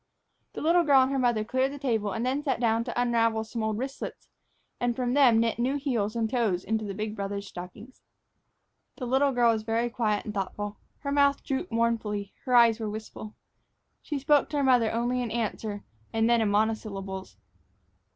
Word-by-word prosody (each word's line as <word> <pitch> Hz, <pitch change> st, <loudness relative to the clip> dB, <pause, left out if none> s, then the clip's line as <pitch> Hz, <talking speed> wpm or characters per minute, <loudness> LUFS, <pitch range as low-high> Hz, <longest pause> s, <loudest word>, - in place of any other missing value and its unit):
The -, -, -6 dB
little 335 Hz, +3 st, +4 dB
girl 275 Hz, -4 st, +6 dB
and 260 Hz, -, -1 dB
her 275 Hz, -, 0 dB
mother 240 Hz, -4 st, +2 dB
cleared 260 Hz, +4 st, 0 dB
the 285 Hz, -, -7 dB
table 225 Hz, -7 st, -1 dB
and 225 Hz, +4 st, -2 dB
then 270 Hz, +3 st, -1 dB
sat 275 Hz, -5 st, 0 dB
down 230 Hz, -1 st, +2 dB
to 240 Hz, -1 st, -3 dB
unravel 230 Hz, -2 st, +2 dB
some 225 Hz, +1 st, -5 dB
old 220 Hz, -1 st, -1 dB
wristlets 265 Hz, +3 st, -6 dB, 0.5 s
and 245 Hz, -1 st, 0 dB
from 245 Hz, 0 st, -1 dB
them 255 Hz, -5 st, +5 dB
knit 230 Hz, 0 st, 0 dB
new 255 Hz, +4 st, +1 dB
heels 240 Hz, -7 st, -1 dB
and 225 Hz, -1 st, 0 dB
toes 220 Hz, -7 st, 0 dB
into 220 Hz, +1 st, -1 dB
the 200 Hz, -1 st, -5 dB
big 215 Hz, +1 st, -4 dB
brothers' 200 Hz, 0 st, -4 dB
stockings. 195 Hz, +7 st, -10 dB, 0.9 s
The 255 Hz, -, -5 dB
little 265 Hz, +3 st, +2 dB
girl 240 Hz, -2 st, +4 dB
was 220 Hz, -, -2 dB
very 230 Hz, +2 st, -1 dB
quiet 215 Hz, -4 st, 0 dB
and 215 Hz, -, -5 dB
thoughtful. 205 Hz, +1 st, -4 dB, 0.2 s
Her 280 Hz, -, -3 dB
mouth 280 Hz, 0 st, +3 dB
drooped 265 Hz, -3 st, -3 dB
mournfully, 225 Hz, -3 st, -1 dB
her 250 Hz, -2 st, +2 dB
eyes 235 Hz, -2 st, +6 dB
were 220 Hz, -2 st, -3 dB
wistful. 215 Hz, 0 st, -8 dB, 0.7 s
She 295 Hz, -, -4 dB
spoke 290 Hz, +1 st, +3 dB
to 295 Hz, -, -2 dB
her 285 Hz, -, +1 dB
mother 245 Hz, -4 st, +4 dB
only 240 Hz, +2 st, 0 dB
in 240 Hz, -, -3 dB
answer, 215 Hz, -2 st, -3 dB, 0.3 s
and 225 Hz, 0 st, +2 dB
then 235 Hz, -1 st, +4 dB
in 215 Hz, -, +1 dB
monosyllables. 205 Hz, -3 st, -2 dB
230 Hz, 195 wpm, -27 LUFS, 215-260 Hz, 0.9 s, girl